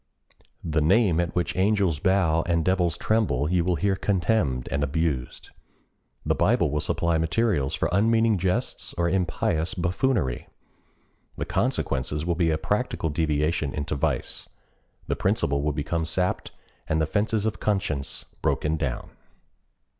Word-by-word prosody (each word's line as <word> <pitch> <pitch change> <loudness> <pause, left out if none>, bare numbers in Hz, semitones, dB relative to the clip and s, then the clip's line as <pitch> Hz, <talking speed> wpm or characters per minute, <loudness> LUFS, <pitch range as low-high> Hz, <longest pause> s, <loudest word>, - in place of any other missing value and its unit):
The 80 -1 0
name 90 +1 +3
at 85 0 -1
which 90 -1 -1
angels 95 -5 +2
bow 90 -3 +2
and 85 -2 +1
devils 90 -4 +2
tremble 80 - +1
you 90 -2 +2
will 90 0 +1
hear 100 +2 +1
contemned 90 - 0
and 70 0 0
abused. 70 -3 -2 0.7
The - - +2
Bible - - +2
will 75 - 0
supply 85 +1 0
materials 80 - +1
for 75 - 0
unmeaning 110 +1 +3
jests 90 +1 -2
or 85 0 +2
impious 90 -1 0
buffoonery. 85 - 0 0.9
The - - -2
consequences 75 +3 -1
will 85 - +1
be 85 -1 +1
a 80 - +1
practical 105 -1 -1
deviation 75 -1 0
into 75 0 -3
vice—the 70 - -4
principle 70 0 +1
will 75 +1 0
become 80 +3 -2
sapped 90 +3 -1 0.4
and 80 - +1
the 80 - +2
fences 105 +5 0
of 110 - -2
conscience 95 -10 -2 0.2
broken 75 +1 0
down. 65 -5 -3
85 Hz, 140 wpm, -25 LUFS, 75-95 Hz, 0.9 s, name